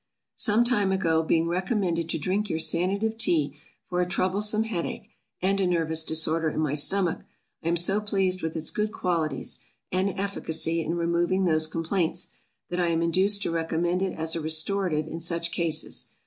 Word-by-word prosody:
SOME 220 Hz, +3 st, +2 dB
time 220 Hz, -6 st, +2 dB
ago 165 Hz, -4 st, +1 dB
being 165 Hz, +1 st, +1 dB
recommended 180 Hz, -2 st, -1 dB
to -, -, 0 dB
drink 195 Hz, +7 st, -1 dB
your 160 Hz, -, -1 dB
Sanative 200 Hz, +7 st, 0 dB
Tea 150 Hz, -9 st, +2 dB, 0.3 s
for 180 Hz, 0 st, -1 dB
a 180 Hz, -, 0 dB
troublesome 205 Hz, +4 st, +1 dB
head 205 Hz, -7 st, -3 dB
ache, -, -, -7 dB, 0.3 s
and 195 Hz, +1 st, +1 dB
a 185 Hz, -, +2 dB
nervous 160 Hz, -2 st, +1 dB
disorder 160 Hz, 0 st, +2 dB
in 155 Hz, -, -4 dB
my 150 Hz, -3 st, 0 dB
stomach, 175 Hz, +4 st, +2 dB, 0.4 s
I -, -, -4 dB
am 170 Hz, +1 st, +2 dB
so 195 Hz, +5 st, +3 dB
pleased 195 Hz, -3 st, 0 dB
with 160 Hz, 0 st, -4 dB
its 160 Hz, -1 st, 0 dB
good 210 Hz, 0 st, -1 dB
qualities, 165 Hz, -8 st, -2 dB, 0.3 s
and 190 Hz, +1 st, -1 dB
efficacy, 165 Hz, -4 st, -1 dB
in 165 Hz, +1 st, -2 dB
removing 175 Hz, +2 st, 0 dB
those 155 Hz, -2 st, +2 dB
complaints, 165 Hz, +2 st, -1 dB, 0.4 s
that 175 Hz, -, -2 dB
I 175 Hz, -, +2 dB
am 165 Hz, 0 st, +1 dB
induced 190 Hz, +4 st, +3 dB
to -, -, -1 dB
recommend 165 Hz, +2 st, -1 dB
it 190 Hz, -1 st, -1 dB
as 160 Hz, 0 st, +1 dB
a 165 Hz, -, -2 dB
restorative 160 Hz, 0 st, +1 dB
in 165 Hz, +1 st, -6 dB
such 170 Hz, 0 st, -1 dB
cases. 165 Hz, -2 st, 0 dB
170 Hz, 180 wpm, -26 LUFS, 160-195 Hz, 0.4 s, so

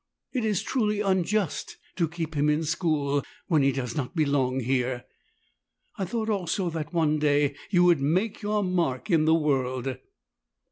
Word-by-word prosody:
It 250 Hz, -4 st, 0 dB
is 210 Hz, -4 st, 0 dB
truly 210 Hz, -5 st, 0 dB
unjust 190 Hz, -3 st, 0 dB, 0.2 s
to 170 Hz, -3 st, +2 dB
keep 165 Hz, -1 st, -5 dB
him 150 Hz, 0 st, +2 dB
in 150 Hz, +2 st, +1 dB
school 150 Hz, -4 st, 0 dB, 0.2 s
when 160 Hz, -4 st, +3 dB
he 140 Hz, 0 st, +4 dB
does 125 Hz, -3 st, -4 dB
not 140 Hz, +3 st, -3 dB
belong 140 Hz, -4 st, +1 dB
here.' 125 Hz, 0 st, -1 dB, 0.9 s
I 190 Hz, -, -2 dB
thought 220 Hz, +4 st, -2 dB
also 185 Hz, -3 st, -1 dB
that, 160 Hz, -1 st, -4 dB
one 155 Hz, -3 st, +2 dB
day, 145 Hz, -1 st, +2 dB, 0.2 s
you 180 Hz, -3 st, +4 dB
would 175 Hz, -5 st, +4 dB
make 185 Hz, +11 st, 0 dB
your 210 Hz, 0 st, 0 dB
mark 175 Hz, -5 st, -1 dB
in 160 Hz, -2 st, +4 dB
the 160 Hz, +1 st, +5 dB
world." 130 Hz, -4 st, 0 dB
160 Hz, 160 wpm, -26 LUFS, 140-185 Hz, 0.9 s, the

